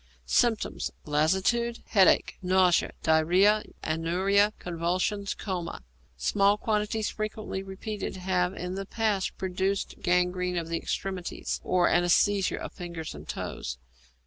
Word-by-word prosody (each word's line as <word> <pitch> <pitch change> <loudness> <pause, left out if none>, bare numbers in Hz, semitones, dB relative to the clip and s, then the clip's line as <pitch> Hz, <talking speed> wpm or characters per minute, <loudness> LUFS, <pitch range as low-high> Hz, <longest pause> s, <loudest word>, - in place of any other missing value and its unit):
Symptoms. 225 - +1 0.2
Lassitude, 190 +11 +1
headache, 195 -4 +4
nausea, 185 -1 +3
diarrhoea, 180 +7 +4 0.2
anuria, 185 +6 +2
convulsions, 180 +4 -1
coma. 175 - -4 0.3
Small 200 - +3
quantities 210 0 -1
frequently 215 -2 -4
repeated 195 +2 -5
have 185 0 0
in 180 +1 -4
the 195 0 -5
past 210 -4 -1
produced 190 +1 -2
gangrene 180 0 +1
of 165 -1 -3
the 165 - 0
extremities, 190 -1 -3
or 180 -1 +3
anæsthesia 185 +3 +3
of - - -6
fingers 170 -3 -6
and - - -11
toes. 60 - -4
185 Hz, 115 wpm, -28 LUFS, 175-205 Hz, 0.3 s, headache